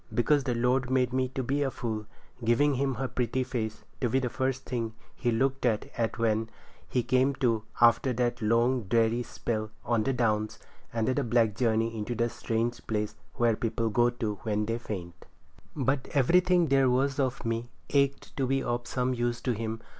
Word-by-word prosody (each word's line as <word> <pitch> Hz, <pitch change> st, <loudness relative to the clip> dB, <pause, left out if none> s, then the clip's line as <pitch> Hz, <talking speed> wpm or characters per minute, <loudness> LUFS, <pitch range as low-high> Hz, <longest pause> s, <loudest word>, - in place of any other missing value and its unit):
Because 140 Hz, +3 st, +2 dB
the 125 Hz, -3 st, 0 dB
Lord 125 Hz, +2 st, +1 dB
made 130 Hz, -1 st, +2 dB
me 130 Hz, 0 st, +1 dB
to 130 Hz, -, -1 dB
be 140 Hz, +4 st, 0 dB
a 140 Hz, -, +2 dB
fool—giving 115 Hz, +4 st, -1 dB
him 135 Hz, 0 st, 0 dB
her 130 Hz, +2 st, -2 dB
pretty 125 Hz, +1 st, -1 dB
face 110 Hz, -4 st, -4 dB, 0.2 s
to 125 Hz, -, +1 dB
be 130 Hz, -, +2 dB
the 125 Hz, -2 st, -1 dB
first 130 Hz, 0 st, -1 dB
thing 115 Hz, -3 st, -3 dB, 0.2 s
he 120 Hz, -, -1 dB
looked 135 Hz, +4 st, 0 dB
at 115 Hz, -1 st, -1 dB
when 110 Hz, -1 st, +1 dB, 0.4 s
he 125 Hz, -, +1 dB
come 130 Hz, +3 st, +2 dB
to 115 Hz, -4 st, +1 dB
after 120 Hz, +2 st, +5 dB
that 120 Hz, 0 st, -1 dB
long, 115 Hz, +2 st, +2 dB
dreary 115 Hz, +3 st, +2 dB
spell 110 Hz, -2 st, -3 dB, 0.2 s
on 115 Hz, -1 st, +2 dB
the 135 Hz, -, +1 dB
Downs, 110 Hz, -4 st, 0 dB, 0.3 s
and 115 Hz, -1 st, -1 dB
that 130 Hz, -1 st, 0 dB
black 115 Hz, -3 st, +3 dB
journey 115 Hz, -1 st, +1 dB
into 110 Hz, +2 st, -3 dB
the 115 Hz, +1 st, +1 dB
strange 115 Hz, +1 st, -2 dB
place 105 Hz, -1 st, -1 dB, 0.2 s
where 120 Hz, -2 st, +3 dB
people 115 Hz, 0 st, -1 dB
go 120 Hz, +3 st, +4 dB
to 110 Hz, -4 st, -3 dB
when 105 Hz, -1 st, 0 dB
they 115 Hz, +2 st, -2 dB
faint. 90 Hz, -6 st, -7 dB, 0.5 s
But 135 Hz, -2 st, 0 dB
everything 180 Hz, +6 st, +4 dB
that 160 Hz, -, -1 dB
there 135 Hz, -1 st, +5 dB
was 135 Hz, +2 st, +1 dB
of 135 Hz, -2 st, -1 dB
me 115 Hz, +1 st, -2 dB, 0.2 s
ached 140 Hz, -1 st, +1 dB
to 135 Hz, -2 st, +1 dB
be 135 Hz, +1 st, +1 dB
of 120 Hz, 0 st, -2 dB
some 130 Hz, 0 st, 0 dB
use 120 Hz, -1 st, -1 dB
to 125 Hz, -, 0 dB
him. 115 Hz, 0 st, -3 dB
120 Hz, 190 wpm, -29 LUFS, 115-130 Hz, 0.5 s, after